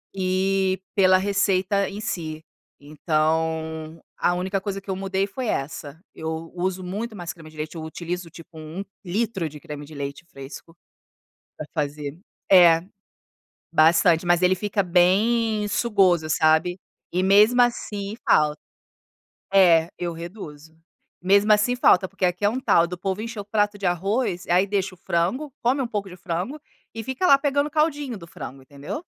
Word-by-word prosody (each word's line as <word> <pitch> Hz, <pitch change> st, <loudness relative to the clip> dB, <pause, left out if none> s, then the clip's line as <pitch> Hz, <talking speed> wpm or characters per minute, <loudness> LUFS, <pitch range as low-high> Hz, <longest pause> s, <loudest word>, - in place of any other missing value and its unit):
E 190 Hz, 0 st, +1 dB, 0.2 s
pela 185 Hz, -2 st, +5 dB
receita 200 Hz, 0 st, +1 dB
em 200 Hz, +2 st, -7 dB
si, 160 Hz, -6 st, -4 dB, 0.3 s
então, 160 Hz, +1 st, -2 dB, 0.2 s
a 175 Hz, -, +1 dB
única 190 Hz, +2 st, -2 dB
coisa 195 Hz, -1 st, -4 dB
que 195 Hz, -, -23 dB
eu 190 Hz, -, -1 dB
mudei 195 Hz, 0 st, -1 dB
foi 235 Hz, +5 st, -5 dB
essa, 145 Hz, -1 st, -4 dB
eu 160 Hz, +1 st, -5 dB
uso 185 Hz, +1 st, -2 dB
muito 210 Hz, +5 st, -5 dB
mais 175 Hz, -2 st, -6 dB
creme 160 Hz, -2 st, -13 dB
de 155 Hz, -, -17 dB
leite, 155 Hz, +2 st, -5 dB
utilizo 170 Hz, +2 st, -5 dB
tipo 165 Hz, 0 st, -13 dB
1 155 Hz, +5 st, -6 dB, 0.2 s
litro 195 Hz, -2 st, -2 dB
de 150 Hz, 0 st, -11 dB
creme 145 Hz, 0 st, -8 dB
de 155 Hz, -, -12 dB
leite 140 Hz, +3 st, -6 dB
fresco 140 Hz, +3 st, -11 dB, 0.8 s
para -, -, -6 dB
fazer. 145 Hz, -1 st, -4 dB, 0.3 s
É, 170 Hz, -3 st, +7 dB, 0.9 s
bastante 165 Hz, +1 st, +4 dB
mas 175 Hz, 0 st, +3 dB
ele 180 Hz, 0 st, +4 dB
fica 205 Hz, +1 st, -1 dB
bem 210 Hz, +5 st, +2 dB
sugoso 190 Hz, -8 st, +2 dB
sabe, 160 Hz, +3 st, +2 dB, 0.3 s
e 180 Hz, +1 st, 0 dB
mesmo 210 Hz, +6 st, +5 dB
assim 210 Hz, -4 st, -1 dB
falta. 150 Hz, 0 st, +3 dB, 1.0 s
É, 170 Hz, -4 st, +6 dB
eu 175 Hz, -1 st, -3 dB
reduzo. 160 Hz, -3 st, -9 dB, 0.5 s
Mesmo 200 Hz, +3 st, +4 dB
assim 210 Hz, +4 st, +2 dB
falta, 190 Hz, -6 st, +4 dB
porque 195 Hz, -1 st, -1 dB
aqui 180 Hz, +2 st, -1 dB
é 205 Hz, -, +5 dB
um 245 Hz, +4 st, -3 dB
tal 170 Hz, -9 st, +4 dB
do 180 Hz, +1 st, -6 dB
povo 190 Hz, +2 st, -3 dB
encher 230 Hz, -1 st, -6 dB
o 200 Hz, -, -6 dB
prato 205 Hz, 0 st, 0 dB
de 200 Hz, -, -6 dB
arroz 185 Hz, +2 st, 0 dB
e -, -, -4 dB
aí 185 Hz, +3 st, +4 dB
deixa 195 Hz, -2 st, -1 dB
o -, -, -28 dB
frango, 185 Hz, -, -1 dB
come 255 Hz, +4 st, +2 dB
um 255 Hz, -, -2 dB
pouco 205 Hz, -4 st, -4 dB
de 180 Hz, -, -11 dB
frango 180 Hz, -, -4 dB, 0.3 s
e 225 Hz, -, -5 dB
fica 260 Hz, -, -2 dB
lá 280 Hz, -6 st, +7 dB
pegando 285 Hz, +1 st, 0 dB
o -, -, -11 dB
caldinho 295 Hz, -5 st, 0 dB
do 170 Hz, -, -12 dB
frango 135 Hz, -4 st, -9 dB
entendeu. 145 Hz, -, -7 dB
185 Hz, 165 wpm, -24 LUFS, 160-205 Hz, 1.0 s, É